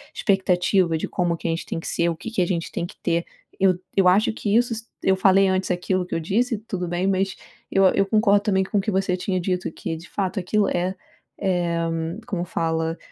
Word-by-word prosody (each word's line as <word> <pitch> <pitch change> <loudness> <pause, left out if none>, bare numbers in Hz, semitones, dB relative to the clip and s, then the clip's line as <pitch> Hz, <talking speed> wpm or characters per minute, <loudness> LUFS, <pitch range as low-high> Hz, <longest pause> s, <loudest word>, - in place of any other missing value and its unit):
expectativa 185 -3 +2
de - - -3
como 175 -2 0
que - - -14
a - - +1
gente 165 - -3
tem - - -4
que - - -7
ser? 170 - +1
O 165 - -2
que 225 - -7
que 225 - 0
a - - +3
gente 170 -3 -2
tem 170 - -2
que - - -10
ter? 170 -1 +1 0.3
Eu 185 -2 +4 0.2
eu 190 - +5
acho 195 +5 +4
que 210 -1 -1
isso 240 +1 +3
s 225 +1 -6 0.2
eu 190 0 +3
falei 195 0 +5
antes 185 0 0
aquilo 180 +1 0
que - - -4
eu - - 0
disse, 230 +8 0
tudo 190 -5 -4
bem, 175 +2 -1
mas 195 0 0 0.4
eu 195 - +4
eu 195 - +3
concordo 205 0 +3
também 190 -2 +2
com 200 +2 -2
o - - +1
que 200 - -3
você 190 -1 0
tinha 185 0 -1
dito 180 0 -1
que, 165 - -4
de 165 - -12
fato, 195 0 -2
aquilo 200 +3 +1
é, 180 +2 -1 0.5
eh. 175 -3 0 0.4
Como 180 -3 -2
fala? 165 -1 -1
185 Hz, 235 wpm, -23 LUFS, 175-195 Hz, 0.5 s, eu